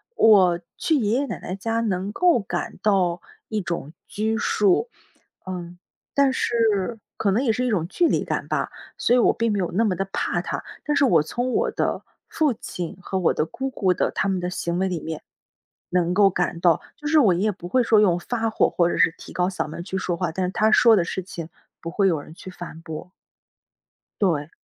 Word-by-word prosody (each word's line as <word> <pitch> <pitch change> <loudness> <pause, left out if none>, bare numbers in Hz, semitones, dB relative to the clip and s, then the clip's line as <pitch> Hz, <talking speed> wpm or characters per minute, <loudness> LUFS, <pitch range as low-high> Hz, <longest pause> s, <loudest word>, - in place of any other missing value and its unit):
我 190 -6 +5 0.2
去 320 - +1
爷 220 -7 +1
爷 285 - 0
奶 210 - -5
奶 185 - -5
家 225 +3 -1
能 195 -2 -1
够 350 -1 +4
感 200 - -4
到 185 -4 +2 0.3
一 215 - -1
种 170 -5 -4 0.2
拘 220 +2 -1
束， 210 - +2 0.6
嗯， 175 -2 -6 0.4
但 280 -1 +4
是， 225 -3 0 0.2
可 200 - +1
能 235 +7 +1
也 235 - +3
是 250 +3 -1
一 - - +1
种 190 -8 0
距 345 - +2
离 - - +1
感 - - -3
吧， - - -1 0.3
所 - - +2
以 250 - +5
我 - - +4
并 230 0 0
没 205 - 0
有 180 - -1
那 215 +6 +2
么 210 -5 +2
地 195 +2 -2
怕 - - 0
他， - - -4 0.2
但 295 - 0
是 280 - +3
我 175 - +5
从 245 +11 -2
我 470 +2 +1
的 - - -2 0.3
父 305 -5 +1
亲 175 -6 -6
和 190 +1 -2
我 180 - +2
的 - - 0
姑 265 +10 -4
姑 190 -8 +1
的 - - 0
他 - - +1
们 190 -1 0
的 180 0 -2
行 170 -1 -2
为 190 - +1
里 175 -3 -3
面， 160 -1 -5 0.7
能 180 -1 +1
够 200 +1 +5
感 175 -2 -2
到 170 -3 +4
就 295 - -7
是 315 0 +5
我 215 -10 +5
爷 175 - -1
爷 215 +1 +2
不 180 -3 -9
会 250 +7 +2
说 225 -2 +4
用 185 -5 +4
发 225 +4 -2
火， 220 - +2
或 170 -1 +2
者 - - -2
是 170 -1 +4
提 - - -11
高 180 0 +1
嗓 190 - -3
门 155 +3 -7
去 190 +1 -4
说 180 -2 -1
话， 175 -3 -1
但 185 +2 -1
是 180 - -2
他 215 +1 +3
说 230 +1 +6
的 185 - +2
事 180 +2 -3
情， 170 -3 -7 0.3
不 165 - -5
会 195 +2 +2
有 165 -5 +1
人 155 - -13
去 185 - -10
反 175 -3 -9
驳。 160 +2 -8 1.1
对。 160 -7 +1
190 Hz, 245 characters per minute, -23 LUFS, 175-225 Hz, 1.1 s, 说